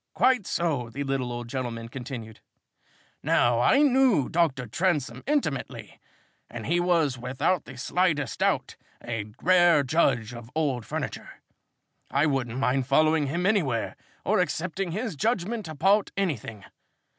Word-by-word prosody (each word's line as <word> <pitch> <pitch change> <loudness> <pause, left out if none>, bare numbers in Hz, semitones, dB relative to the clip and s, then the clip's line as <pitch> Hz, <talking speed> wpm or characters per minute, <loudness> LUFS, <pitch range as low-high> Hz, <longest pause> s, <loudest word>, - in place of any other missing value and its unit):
"Quite 255 -6 +3
so," 145 -9 -1
the 140 +5 -4
little 135 -3 -2
old 120 0 -5
gentleman 120 -2 -4
continued. 120 -3 -8 0.8
"Now 120 -1 +3
I 265 - +4
knew 260 - +3
Dr. 155 -7 +1
Transome 135 - -1
intimately, 290 -1 -2 0.5
and - - -7
he 175 - +1
was, 165 -7 +1
without 130 +8 -1
the - - -11
slightest 150 -3 0
doubt, - - 0 0.3
a 110 -3 -4
rare 175 -4 +5
judge 125 -5 +1
of 120 -1 -10
old 135 -7 -1
furniture. - - -5 0.8
I 140 +2 +2
wouldn't 130 -5 -1
mind 130 0 +1
following 155 +1 +3
him 170 +6 -2
anywhere, 160 - +1 0.3
or - - +2
accepting 185 +2 -1
his 215 +1 -3
judgment 215 - -1
about 190 +7 +2
anything. 115 - -3
145 Hz, 135 wpm, -26 LUFS, 125-180 Hz, 0.8 s, rare